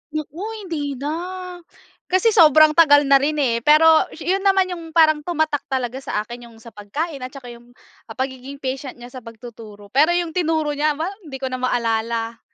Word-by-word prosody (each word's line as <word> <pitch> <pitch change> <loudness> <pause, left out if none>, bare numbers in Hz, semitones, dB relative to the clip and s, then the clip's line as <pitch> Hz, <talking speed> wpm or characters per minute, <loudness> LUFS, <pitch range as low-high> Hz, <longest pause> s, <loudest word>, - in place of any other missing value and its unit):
Naku 305 +1 -5 0.2
hindi 295 -6 -4
na, 280 +4 -4 1.0
kasi 375 +5 +2
sobrang 310 -5 +6
tagal 295 -3 +5
na 275 -1 +5
rin 295 +3 -1
eh, 250 -6 0
pero 315 +5 +5 0.2
yun 380 +2 0
naman 385 -1 +2
yung 330 -2 -8
parang 310 -2 +5
tumatak 315 -2 -2
talaga 260 -1 -3
sa 210 -5 -3
akin 240 +2 -10
yung 230 - -17
sa 230 - -12
pagkain 275 +10 -5
at 255 - -5
tsaka 255 -2 -11
yung 240 +1 -16 0.4
pagiging 260 +1 -5
patient 265 -1 -5
niya 245 0 -12
sa 255 - -8
pagtuturo, 220 -3 -13
pero 305 +7 +3
yung 345 -2 -1
tinuro 315 -3 0
niya 295 +1 0
aba 325 +5 -3 0.2
hindi 275 - -8
ko 265 -1 -5
na 255 - -4
maalala. 230 -2 -2
280 Hz, 180 wpm, -20 LUFS, 245-315 Hz, 1.0 s, sobrang